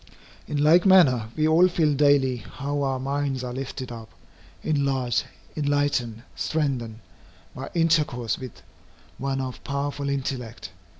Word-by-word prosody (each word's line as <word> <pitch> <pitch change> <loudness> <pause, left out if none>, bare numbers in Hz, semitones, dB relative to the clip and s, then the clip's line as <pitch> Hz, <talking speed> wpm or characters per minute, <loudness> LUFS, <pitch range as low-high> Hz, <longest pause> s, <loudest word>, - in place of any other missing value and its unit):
In 150 - -2
like 165 +4 +6
manner 145 - +5
we 155 0 +2
all 165 +3 +6
feel 160 -4 +1
daily 140 -3 +3
how 140 +4 -4
our 135 -2 0
minds 135 -1 -2
are 125 -1 -4
lifted 130 -1 -5
up, 115 -1 -9 0.5
enlarged, 135 -5 0 0.3
enlightened, 145 -6 0
strengthened, 125 -8 -2 0.5
by 130 +1 -7
intercourse 150 -8 +1
with 130 -3 -9 0.6
one 135 0 -1
of 130 -1 -5
powerful 140 0 -3
intellect. 130 -4 -4
140 Hz, 125 wpm, -25 LUFS, 125-145 Hz, 0.6 s, like